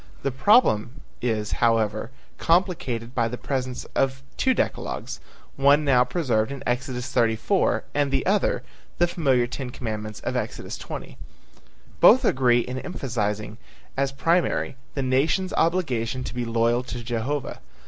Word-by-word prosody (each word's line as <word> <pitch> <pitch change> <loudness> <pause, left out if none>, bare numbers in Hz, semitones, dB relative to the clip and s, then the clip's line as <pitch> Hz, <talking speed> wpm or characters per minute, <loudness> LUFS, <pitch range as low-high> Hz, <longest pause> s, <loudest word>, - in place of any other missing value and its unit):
The 140 - 0
problem 130 - +3 0.2
is, 110 -3 -1
however, 110 -1 +1 0.3
complicated 155 -10 0
by 115 -3 +1
the 125 +2 -5
presence 130 -2 -3
of 135 0 0
two 260 -1 +2
decalogues, - - -3 0.4
one 140 +2 +4
now 125 -3 +5
preserved 125 -4 0
in 140 - -6
Exodus 125 0 -2
34 120 - +1
and 145 -1 +1
the 135 -1 0
other, 200 +1 +1 0.3
the 175 - +4
familiar 135 -8 +2
ten 125 +1 -5
commandments 110 -3 -5
of - - -3
Exodus - - -4
20. - - -8 0.8
Both - - +7
agree 125 -2 +3
in 125 +2 -5
emphasizing 110 - -3 0.4
as 135 0 0
primary 165 +2 +1 0.2
the 135 - -1
nation's 150 +9 +1
obligation 130 -8 0
to - - -6
be 120 -1 -2
loyal 115 +1 +2
to 120 -2 -6
Jehovah. 120 +5 -3
130 Hz, 140 wpm, -24 LUFS, 115-140 Hz, 0.8 s, Both